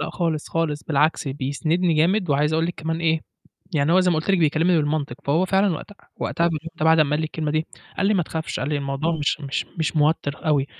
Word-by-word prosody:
لا - - -3
خالص، 165 -4 -2
خالص، 155 -3 -1
بالعكس 150 -1 +1
بيسندني 155 +6 0
جامد، 180 +3 +2
وعايز 150 +2 +2
أقول 165 +1 +1
لِك 175 - -4
كمان 160 +1 -3
إيه 160 -1 +2 0.5
يعني 150 +2 +2
هو 185 - +6
زي 180 -1 +3
ما 165 - +1
قُلت 160 +5 -1
لِك 190 - +3
بيكلمني 165 +3 +3
بالمنطق، 145 -4 -1
فهو 160 +6 +2
فعلًا 190 -1 +2
وقت 155 - -8 0.3
وقتها 170 0 0 0.3
بعد 160 +1 +5
أمّا 145 -2 +3
قال 150 - +1
لي 160 - -1
الكلمة 155 -1 -3
دي، 155 +1 0 0.3
قال 195 - +1
لي: 210 - +3
"ما 180 - +2
تخافش" 160 0 -4
قال 135 - -2
لي: 150 - 0
"الموضوع 140 +3 -1
مش 150 +1 0
مش 140 -1 -3
مش 160 0 -1
موتّر 150 0 0
أوي، 145 -3 +2
160 Hz, 230 wpm, -23 LUFS, 150-170 Hz, 0.5 s, هو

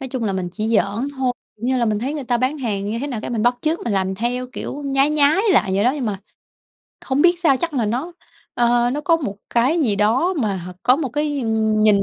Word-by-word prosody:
nói 265 - -5
chung 250 -2 -3
là 200 - 0
mình 185 -2 -2
chỉ 215 +4 -3
giỡn 225 +3 +1
thôi, 260 -2 0 0.2
kiểu 225 - -9
như 260 0 +1
là, 235 - +2
mình 210 -2 0
thấy 270 +6 -3
người 290 - -4
ta 245 0 +1
bán 260 +5 -1
hàng 205 -6 -2
như 230 - -2
thế 285 - -3
nào 240 -6 -4
cái - - -5
mình 225 -3 -1
bắt 245 +1 +3
chước 315 +4 0
mình 230 - -1
làm 190 -1 0
theo, 245 +4 -2
kiểu, 290 - -6
nhái 275 +1 +2
nhái 300 +3 +4
lại 195 - +3
vậy 200 +3 +1
đó. 250 - +4
Nhưng 270 -6 -3
mà 200 -2 -3 0.8
hổng 270 +2 +1
biết 350 0 +4
sao 295 -7 +4
chắc 330 +2 -3
là 240 -5 +1
nó, 255 +11 -2 0.4
ờ, 240 0 +2
nó 285 +4 -2
có 330 +2 +3
một 235 -11 -5
cái 260 +8 +2
gì 220 -9 +1
đó 245 - +2
mà 200 -3 0
h 180 0 -7
có 255 - +4
một 290 -3 -2
cái, 295 +3 -2
ừm, 220 -2 +1
nhìn 210 -2 +5
245 Hz, 270 wpm, -20 LUFS, 215-280 Hz, 0.8 s, nhìn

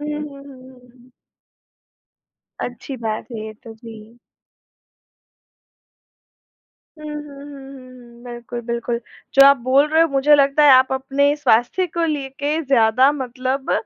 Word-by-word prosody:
हुँ, 295 - -6
हुँ, 300 0 -4
हुँ, 275 0 -13
हुँ। 255 -2 -17 1.5
अच्छी 245 +3 -6
बात 225 +1 -5
है 225 - -6
ये 215 - -8
तो। 225 -1 -11
जी। 225 0 -14 2.8
हुँ, 305 - -10
हुँ, 300 0 -6
हुँ, 280 -1 -12
हुँ, 255 -3 -13
हुँ। 240 +1 -18
बिल्कुल, 240 0 -8
बिल्कुल। 235 0 -3 0.4
जो 275 0 +8
आप 280 0 +6
बोल 265 +4 +2
रहे 320 +1 +3
हो 330 - +4
मुझे 280 +1 +3
लगता 280 +1 +2
है 285 - +7
आप 260 0 +5
अपने 275 +2 0
स्वास्थ्य 295 +7 +1
को 335 +1 -3
लेके 290 +1 -3
ज़्यादा 255 +1 +3
मतलब 260 -1 -4
265 Hz, 140 wpm, -19 LUFS, 240-285 Hz, 2.8 s, जो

